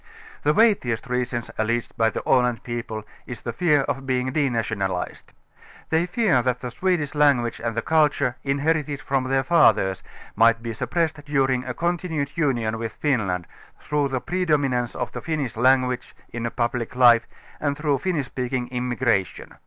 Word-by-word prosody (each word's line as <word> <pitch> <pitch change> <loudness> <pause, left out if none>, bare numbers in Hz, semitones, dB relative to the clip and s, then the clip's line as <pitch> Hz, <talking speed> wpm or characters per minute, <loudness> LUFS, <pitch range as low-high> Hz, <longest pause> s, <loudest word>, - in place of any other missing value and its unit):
The 150 - +2
weightiest 200 - +2
reason, 125 -1 -2 0.2
alleged 115 +2 -1
by 115 0 +3
the - - -5
Aland 125 -2 +2
people, 120 -2 -5 0.2
i& 125 - -5
the 115 0 -6
fear 150 +1 +3
of 135 0 -3
being 130 0 0
denationalized. 110 -9 -2 0.6
They 165 +2 +2
fear 180 - +2
that 125 0 -1
the 125 -2 -5
Swe 185 +8 +1
dish 150 -3 -4
language 140 -6 +2
and 115 -2 -2
the 115 - 0
culture, 150 -5 +2
inherited 145 +1 0
from 135 -2 -1
their 135 +1 +1
fathers, 95 - +3 0.3
might 115 +1 +4
be 115 -1 -4
suppressed 160 +3 -2
during 135 -3 +1
a 125 - -4
continued 165 -4 -2
union 120 -8 0
with 115 -1 -4
Finland, 100 - -1 0.3
through 150 -1 0
the 130 -2 -2
i)redominance 145 -9 0
of 125 -3 -3
the - - -6
Finnish 155 -7 -3
language 125 +1 +2 0.2
in 120 0 -2
public 120 0 -2
life 120 -2 +6 0.3
and 145 -1 -1
through 145 -3 0
Finnish 165 -4 -1
speaking 125 -1 -3
immigration. 125 -5 -1
130 Hz, 160 wpm, -23 LUFS, 120-150 Hz, 0.6 s, life